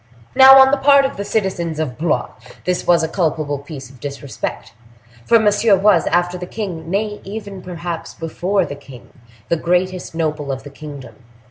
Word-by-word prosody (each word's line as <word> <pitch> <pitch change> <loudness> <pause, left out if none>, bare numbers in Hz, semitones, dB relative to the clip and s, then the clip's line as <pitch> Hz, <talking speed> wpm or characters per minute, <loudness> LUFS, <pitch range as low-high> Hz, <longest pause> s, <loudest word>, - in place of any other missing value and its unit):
Now, 265 +1 +9
on 265 0 +7
the 285 - +3
part 280 0 +5
of 270 - -3
the 200 - -4
citizens 185 -7 -2
of 145 -6 -2
Blois 160 0 -1 0.3
this 180 -1 -1
was 170 -2 +4
a - - +1
culpable 155 -4 -1
piece 140 -3 -10
of 130 - -18
disrespect, 140 -7 -6 0.5
for 230 - +6
Monsieur 210 -1 +3
was, 195 -2 +3
after 175 +1 0
the 180 - -6
king—nay, 200 +1 -4
even 200 -1 -7
perhaps, 175 -2 -6
before 180 +4 -1
the 145 - -6
king—the 125 -2 -8
greatest 180 +1 -1
noble 150 -3 -2
of 130 0 -5
the 145 - -10
kingdom. 140 -2 -10
175 Hz, 165 wpm, -19 LUFS, 145-200 Hz, 0.5 s, Now